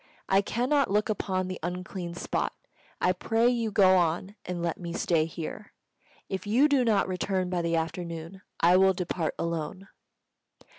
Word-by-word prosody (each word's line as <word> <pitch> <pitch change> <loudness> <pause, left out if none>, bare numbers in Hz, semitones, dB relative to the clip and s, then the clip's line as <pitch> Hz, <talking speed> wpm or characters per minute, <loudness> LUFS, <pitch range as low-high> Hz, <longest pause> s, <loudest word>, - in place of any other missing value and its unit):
I 195 +1 +4
cannot 255 +7 +1
look 210 +2 +1
upon 185 -3 -1
the 185 -1 -5
unclean 180 0 -5
spot. - - -2 0.5
I 180 - +3
pray 225 +6 +2
you 235 -2 0
go 190 -3 +5
on, 175 +3 0
and 180 -1 -4
let 170 -1 -2
me 170 -2 -5
stay 165 -3 +1
here. 165 +5 -7 0.5
If 190 +1 -4
you 250 +8 +5
do 280 -4 +3
not 215 -5 +2
return 185 0 -1
by 180 -1 0
the 170 0 0
afternoon, 165 +2 -4 0.2
I 175 +2 +5
will 190 0 +5
depart 175 -2 -2
alone." 170 +3 -4
185 Hz, 160 wpm, -28 LUFS, 170-205 Hz, 0.5 s, go